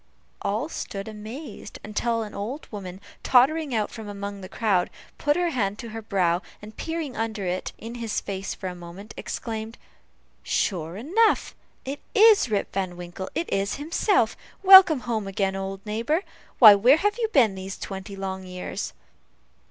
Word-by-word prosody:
All 220 +9 -1
stood 200 -10 -6
amazed, 220 +2 -8
until 230 +2 -1
an 210 - -9
old 240 +10 -5
woman, 190 -3 -7 0.2
tottering 275 +2 +3
out 215 -2 0
from 220 -2 -8
among 200 0 -6
the 185 - -9
crowd, 200 -5 +1 0.3
put 290 0 +2
her 355 -1 +1
hand 205 -7 -1
to 230 - -7
her 225 +1 -6
brow, 180 -5 +1 0.2
and 215 +1 -12
peering 325 -5 -4
under 220 -3 -3
it 180 +1 -2
in 230 +1 -8
his 230 -3 -2
face 195 -1 -5
for - - -9
a 180 - -4
moment 180 +4 -10
exclaimed, 225 -1 -5 0.6
"sure 170 -3 -1
enough! 385 - +2 0.3
it 275 +2 -4 0.2
is 430 - +6
Rip 205 -2 -1
Van 185 -2 -2
Winkle 180 +2 -7
it 335 - -1
is 195 0 0
himself. 335 +7 +1 0.3
Welcome 375 -7 +9
home 220 -4 -2
again, 195 0 -1
old 195 +1 -5
neighbor. 230 - 0 0.3
Why, 215 -4 +11
where 240 +9 +5
have 415 +6 0
you 455 - +1
been 255 - +4
these 190 +1 -6
twenty 195 +1 -7
long 190 -1 -4
years?" 180 +2 -5
215 Hz, 165 wpm, -25 LUFS, 195-265 Hz, 0.6 s, Why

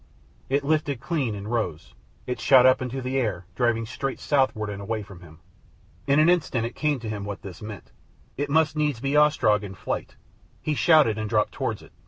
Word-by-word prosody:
It 140 +2 +1
lifted 145 -3 0
clean 135 -8 -2
and 100 +1 -7
rose. 110 -9 -3 0.3
It 125 - -3
shot 130 -2 +6
up 130 +1 +5
into 130 +1 -4
the 130 +1 -1
air, 100 -8 -2
driving 120 -2 +1
straight 130 +4 -4
southward 130 -7 +1
and 100 0 -6
away 110 +1 -3
from 95 -4 -13
him. 80 -3 -15 0.7
In 140 +1 +3
an 155 - +5
instant 155 -9 +2
it 120 - -5
came 150 -3 0
to 115 - -6
him 105 -2 -4
what 100 -2 -6
this 95 -4 -9
meant. 105 -4 -9 0.4
It 145 +1 -3
must 155 +1 +2
needs 150 -5 0
be 135 +3 -1
Ostrog 150 -8 +4
in 95 -2 -7
flight. - - -4 0.4
He 155 - -2
shouted 150 - +4
and 110 -1 -3
dropped 105 -1 +1
towards - - -3
it. - - -17
125 Hz, 205 wpm, -25 LUFS, 105-145 Hz, 0.7 s, shot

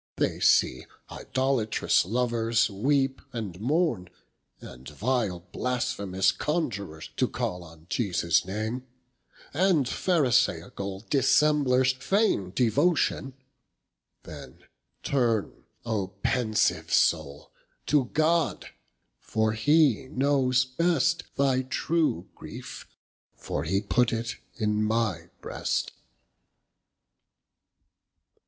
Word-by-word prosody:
They - - -1
see 65 - +3 0.2
idolatrous 130 -8 0
lovers 115 0 +1
weepe 135 +5 0
and 100 -7 -5
mourne, 130 - 0 0.5
And 65 +2 -11
vile 105 - -1
blasphemous 100 -7 0
Conjurers 100 - -3
to - - +2
call 90 0 -4
On 80 -1 -15
Jesus 90 -6 +1
name, 110 +6 -4 0.7
and 170 -3 +3
Pharisaicall 120 - 0
Dissemblers 135 -2 +3
feigne 130 - +1
devotion. 135 - +1 0.9
Then - - -11 0.4
turne 120 -6 -1 0.2
O 110 -5 -1 0.2
pensive 115 -3 +1
soule, 75 -3 +1 0.3
to 145 -3 +2
God, 155 +5 0 0.5
for 110 0 0
he 140 +1 +3
knows 130 -2 +2
best 165 +4 +1
Thy 135 -2 +2
true 130 - -1
griefe, - - -10 0.5
for - - -4
he 95 +4 0
put 115 +3 +1
it 115 0 -3 0.2
in 105 -2 0
my 105 -7 -1
breast. - - -2
120 Hz, 90 wpm, -27 LUFS, 100-140 Hz, 0.9 s, see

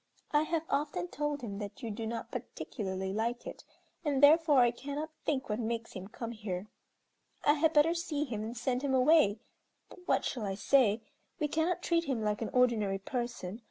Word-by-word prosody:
I 295 - +4
have 330 -1 0
often 280 - -1
told 295 +1 -2
him 200 -3 -5
that 205 +5 -7
you 230 - -3
do 225 +2 -4
not 230 0 -5
particularly 190 -3 -4
like 235 +3 -2
it, - - -8 0.4
and 290 -3 0
therefore 300 -2 +7
I 240 -1 +5
cannot 285 +5 -5
think 265 -3 0
what 210 +1 -2
makes 230 0 -3
him 190 0 -7
come 230 +2 -6
here. 205 -4 -4 0.8
I 295 - +6
had 310 +1 +3
better 315 +1 +5
see 335 -4 -2
him 235 -7 -4
and 225 +3 -5
send 250 +1 0
him 275 -2 +1
away, 255 -6 +5 0.5
but - - -12
what - - +2
shall 245 - -2
I 195 -1 -2
say. 225 -1 +3 0.4
We 300 - +1
cannot 325 +4 0
treat 335 -1 +2
him 250 -6 -1
like 210 0 0
an 225 - -2
ordinary 225 -6 +2
person. 235 -2 -4
245 Hz, 195 wpm, -32 LUFS, 215-295 Hz, 0.8 s, therefore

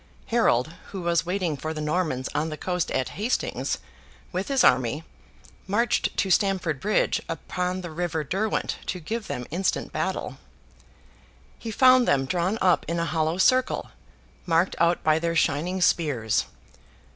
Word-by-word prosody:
Harold, 155 - +3 0.2
who 190 -2 -4
was 170 -1 +1
waiting 180 -4 -1
for 155 +3 -5
the - - -4
Normans 150 -4 -1
on 150 +2 0
the 155 - -5
coast 180 0 -2
at 130 -1 -1
Hastings, 220 +5 -1 0.5
with 185 +2 -2
his 270 -2 +2
army, 130 +5 +3 0.6
marched 230 +5 +1
to 195 - +1
Stamford 180 -7 +1
Bridge 210 +8 +1
upon 180 +2 -3
the 175 -2 -7
river 165 -1 -2
Derwent 200 +8 -1
to 185 - -2
give 215 +6 -4
them 125 - -4
instant 180 +3 -1
battle. - - -3 1.2
He 230 - -6
found 255 +2 +5
them 135 -1 +3
drawn 180 +7 0
up 180 -2 +4
in 170 - -1
a 170 - 0
hollow 160 0 0
circle, 255 +6 +2 0.6
marked 170 +2 +2
out 170 +1 +2
by 155 0 +3
their 170 0 -1
shining 170 +5 +1
spears. 130 -12 +2
175 Hz, 150 wpm, -25 LUFS, 155-190 Hz, 1.2 s, found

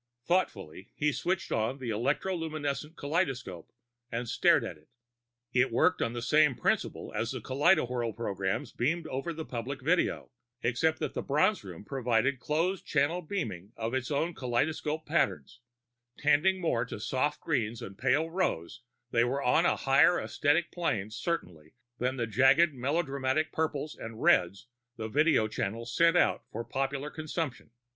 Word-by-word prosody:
Thoughtfully, 100 - -1
he 150 0 +1
switched 185 +5 -2
on 110 +5 0
the 125 -4 -4
electroluminescent 155 - -2
kaleidoscope 135 - -2 0.4
and 120 0 -3
stared 160 +3 +4
at 90 - -6
it. 75 - -24 0.6
It 130 0 +3
worked 180 +10 +3
on 115 - 0
the 120 -1 -4
same 150 +1 +4
principle - - -1
as - - -1
the - - -4
kaleidowhirl 130 - +1
programs 100 -4 -2
beamed 160 +7 -1
over 135 +4 -3
the 160 -1 -6
public 125 +3 -5
video, 170 -1 +1 0.3
except 145 +7 +1
that - - -2
the - - -2
Bronze 185 +9 +2
Room 95 0 -9
provided 130 0 +1
closed 170 +8 0
channel 150 +5 +1
beaming 110 - -4
of 115 +1 -3
its 130 -2 -1
own 160 +4 0
kaleidoscopic 150 +4 -1
patterns; 150 -5 0 0.6
tending 150 +6 +3
more 140 -10 +1
to 115 - -7
soft 135 +7 -1
greens 115 -7 -1
and 100 - -8
pale 135 +8 +2
rose, 120 - -2 0.3
they 115 - +4
were 135 +3 -1
on 125 - +4
a - - +2
higher 140 +6 +4
esthetic 160 +3 +1
plane, 110 - -1
certainly, 90 - -4 0.2
than 125 +2 -1
the 120 - 0
jagged, 135 +8 +4
melodramatic 140 +2 0
purples 155 -1 -2
and 115 0 -8
reds 100 - +3 0.3
the 110 - -4
video 150 -2 +3
channels 115 +3 -4
sent 170 +1 +5
out - - +2
for 115 - -4
popular 135 +3 -3
consumption. 155 -5 -4
135 Hz, 150 wpm, -30 LUFS, 115-160 Hz, 0.6 s, sent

